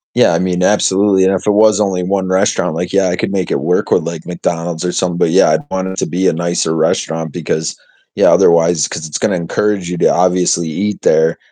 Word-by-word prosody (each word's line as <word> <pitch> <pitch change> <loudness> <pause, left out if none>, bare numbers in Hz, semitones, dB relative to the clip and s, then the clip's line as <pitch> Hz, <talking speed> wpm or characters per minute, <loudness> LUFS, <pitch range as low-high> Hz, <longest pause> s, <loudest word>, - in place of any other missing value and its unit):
Yeah, - - +4
I - - +1
mean, 90 -1 -1
absolutely, 95 -1 +2
and 95 - +2
if 95 - -3
it 105 - +2
was 105 0 +3
only 95 -3 0
one 95 +1 -2
restaurant, 95 -2 0
like, 90 +3 -4
yeah, 100 -1 +2
I 90 - -2
could - - -3
make 95 -2 -2
it - - 0
work 85 +6 -1
with, - - +2
like, 85 -1 -6
McDonald's 85 -1 -4
or 90 - -2
something, 90 -2 -1
but, 85 - +1
yeah, 95 +4 +4
I'd 80 +1 -1
want 95 0 -3
it 95 - -7
to - - -1
be 95 +2 -1
a - - +2
nicer 85 -1 -1
restaurant 80 0 -1
because 80 +2 -3 0.4
Yeah, - - +4
otherwise, 85 -2 +3
'cause 80 - -6
it's 75 - -4
gonna 100 -3 0
encourage 90 +2 -2
you 90 - -4
to - - 0
obviously 90 -2 +1
eat 100 +6 -3
there, 80 +1 +2
90 Hz, 235 wpm, -15 LUFS, 85-95 Hz, 0.4 s, Yeah